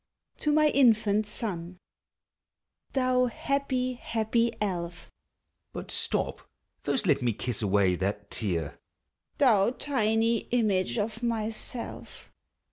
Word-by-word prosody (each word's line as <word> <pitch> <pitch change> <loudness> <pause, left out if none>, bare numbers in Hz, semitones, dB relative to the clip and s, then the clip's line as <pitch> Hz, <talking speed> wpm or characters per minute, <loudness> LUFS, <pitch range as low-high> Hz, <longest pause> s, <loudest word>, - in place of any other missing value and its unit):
TO 300 - +1
MY 305 0 +4
INFANT 215 -6 +3
SON. 185 -5 -1 1.2
Thou 255 -1 +3
happy, 255 0 -1
happy 230 -1 0
elf! 175 -4 -4 0.6
(But - - -7
stop, - - -2 0.4
first 245 - 0
let 145 -6 +3
me 120 -2 +1
kiss 115 +1 -3
away 100 -3 +3
that 100 +3 -3
tear,) 85 -9 -2 0.6
Thou 225 -8 +4
tiny 230 -4 +1
image 215 -5 +1
of 220 +1 -2
myself! 230 0 -3
220 Hz, 105 wpm, -28 LUFS, 170-245 Hz, 1.2 s, MY